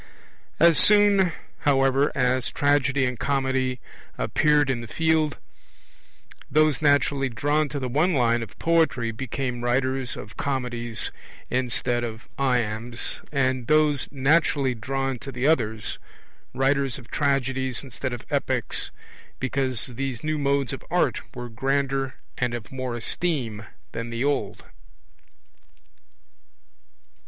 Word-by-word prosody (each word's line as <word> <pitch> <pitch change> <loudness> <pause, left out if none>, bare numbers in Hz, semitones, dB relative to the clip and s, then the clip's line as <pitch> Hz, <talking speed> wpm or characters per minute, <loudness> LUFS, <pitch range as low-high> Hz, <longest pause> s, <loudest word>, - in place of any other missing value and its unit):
As 170 -1 +7
soon, 205 -3 +6 0.3
however, 135 0 +3
as 125 -1 +1
Tragedy 140 -1 +2
and 125 -2 -3
Comedy 130 -2 0 0.4
appeared 150 -2 +2
in 130 -3 -1
the 120 - -8
field, 160 +2 +1 1.1
those 155 -4 +3
naturally 145 -2 +2
drawn 145 +5 0
to 145 - -4
the 130 - -3
one 155 +8 +2
line 120 -2 +2
of 115 -3 -8
poetry 160 -9 +2
became 125 +1 -4
writers 130 +1 0
of 105 - -10
comedies 120 -4 -2 0.4
instead 125 -1 +1
of 110 -1 -6
iambs, 120 -2 -1
and 130 -3 0
those 155 -2 +3
naturally 140 -1 +2
drawn 135 +2 -3
to 135 - -7
the 125 +1 -3
other, 115 -8 +2 0.7
writers 135 0 +1
of 120 -3 -14
tragedies 135 -3 0
instead 130 0 -5
of 120 -1 -6
epics, - - 0 0.5
because 130 -2 0
these 130 0 -4
new 155 0 -1
modes 140 -3 +1
of - - -7
art - - +1
were 120 0 -5
grander 135 +2 -1 0.2
and 125 -1 0
of 110 -5 -8
more 130 -2 -4
esteem 120 - -2 0.2
than 115 +1 -5
the 115 +2 -2
old. 145 0 -1
130 Hz, 120 wpm, -25 LUFS, 120-145 Hz, 1.1 s, As